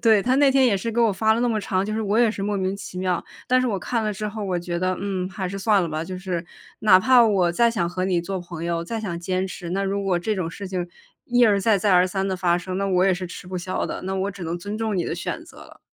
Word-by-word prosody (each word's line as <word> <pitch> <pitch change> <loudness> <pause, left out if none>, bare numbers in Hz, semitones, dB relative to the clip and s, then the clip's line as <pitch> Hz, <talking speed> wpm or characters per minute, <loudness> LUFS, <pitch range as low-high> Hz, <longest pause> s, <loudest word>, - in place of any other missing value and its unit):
对， 220 -3 +5
她 250 +4 +2
那 280 0 +5
天 265 -1 +4
也 215 -5 +3
是 225 +4 -3
给 235 - +1
我 230 -2 +4
发 220 +3 +2
了 225 - 0
那 245 - +2
么 220 - 0
长， 190 -2 -1
就 215 - -2
是 220 - -1
我 210 +2 +1
也 235 -2 +5
是 200 - -5
莫 205 +1 -1
名 190 0 -1
其 185 -2 -8
妙， 185 -2 -1 0.2
但 255 - +4
是 255 - +1
我 210 -5 -1
看 230 +4 -2
了 215 - 0
之 210 +2 -4
后， 210 0 -5
我 185 -2 -1
觉 175 0 -3
得， 185 +1 0
嗯， 190 -2 -2
还 190 -1 -4
是 195 - -5
算 200 -1 +3
了 170 - -2
吧。 155 +1 -3
就 185 +1 -6
是 180 -2 -3 0.4
哪 190 -4 +6
怕 255 +4 +6
我 190 -5 +3
再 235 +7 +3
想 180 -7 -1
和 185 +1 -2
你 185 -2 +1
做 190 +2 -4
朋 175 -2 -7
友， 170 0 -1
再 225 +6 -4
想 175 -6 -4
坚 185 +2 -1
持， 180 -2 -7
那 195 +2 -1
如 200 +1 -1
果 185 -3 +1
这 210 +4 -2
种 165 -3 -2
事 195 +3 -7
情 180 -2 -3 0.4
一 245 0 +2
而 205 -2 +3
再 205 +1 +3
再 195 0 +3
而 180 +1 +5
三 190 +1 -2
地 190 - -1
发 175 -2 +2
生， 185 +1 -5
那 195 +1 0
我 185 0 +3
也 190 - +3
是 180 +1 -5
吃 180 - -9
不 185 0 -5
消 185 +1 -2
的， - - -5
那 190 +1 -2
我 195 +1 -1
只 195 -2 -10
能 165 +2 -3
尊 205 +4 -5
重 220 -1 -1
你 175 -3 -1
的 - - -2
选 175 - -4
择 340 - -16
了。 - - -14
190 Hz, 335 characters per minute, -23 LUFS, 180-215 Hz, 0.4 s, 哪